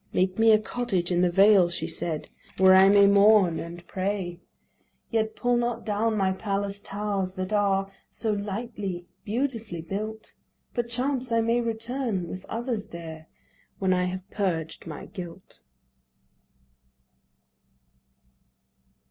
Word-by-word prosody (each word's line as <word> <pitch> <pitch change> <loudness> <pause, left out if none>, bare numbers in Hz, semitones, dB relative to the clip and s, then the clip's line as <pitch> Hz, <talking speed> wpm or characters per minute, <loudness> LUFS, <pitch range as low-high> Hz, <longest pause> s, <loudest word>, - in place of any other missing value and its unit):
"Make 185 +2 +1
me 225 0 +6
a 215 - +7
cottage 210 -5 -2
in 175 0 +2
the 180 - +4
vale," 195 0 +6
she 170 -2 -3
said, 160 -1 -3 0.3
"Where 190 0 +7
I 190 +1 +7
may 200 0 +7
mourn 200 -3 +5
and 170 +1 -8
pray. 185 -2 -3 0.7
"Yet 220 -1 0
pull 245 0 +1
not 240 0 -2
down 215 +1 0
my 190 -2 +2
palace 200 0 -2
towers, 200 -2 -3
that 185 +1 -3
are 195 -1 +1 0.2
So 220 - -2
lightly, 205 -3 -4 0.2
beautifully 225 -6 -2
built. 215 +5 -5 0.4
Perchance 245 +1 -2
I 230 0 +3
may 230 +2 +2
return 230 -4 -2
with 185 +2 -7
others 230 -2 -3
there 160 -3 -9 0.5
When 190 -1 +2
I 180 0 +1
have 185 +1 -5
purged 170 -7 -2
my 155 -2 -7
guilt." 180 -2 -10
200 Hz, 130 wpm, -26 LUFS, 185-225 Hz, 0.7 s, a